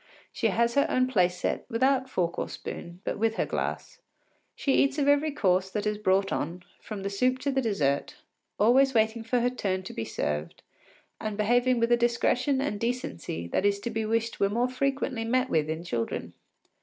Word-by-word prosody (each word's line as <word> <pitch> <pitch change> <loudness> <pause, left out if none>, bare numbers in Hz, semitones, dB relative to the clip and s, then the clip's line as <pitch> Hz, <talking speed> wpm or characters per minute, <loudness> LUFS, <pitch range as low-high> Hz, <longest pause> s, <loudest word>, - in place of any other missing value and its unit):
She - - +1
has 235 0 +1
her 280 - +3
own 255 0 +3
place 180 -8 +2
set, - - -2
without 260 +3 +2
fork 175 -7 -1
or - - -2
spoon, 175 +1 -8
but - - -3
with 225 0 +1
her - - 0
glass. - - -4 0.6
She 275 - 0
eats 275 +1 +3
of 285 -1 +1
every 290 +2 +4
course 190 -9 +1
that 210 +1 -3
is 210 0 -1
brought 195 -1 +2
on, 170 +4 -3 0.2
from 205 -3 -6
the 200 - -1
soup 255 +6 +1
to 280 - 0
the 270 0 +1
dessert, 150 - 0 0.4
always 260 +5 +4
waiting 220 +1 +2
for 240 +2 +1
her 245 - +2
turn 190 -6 -2
to - - -8
be 115 - -3
served 75 -5 -3 0.6
and 215 -1 -4
behaving 245 +3 +3
with 230 +1 +1
a 240 - +6
discretion 245 +3 +1
and 270 -7 -2
decency 205 - -3
that - - 0
it - - +5
is 200 0 -2
to 235 - -3
be 225 - -1
wished 225 +1 -1
were 200 - +3
more 240 +4 +1
frequently 270 -2 -1
met 255 +3 +1
with 155 -1 +1
in 160 +1 -3
children. 120 -9 -3
225 Hz, 205 wpm, -28 LUFS, 190-255 Hz, 0.6 s, a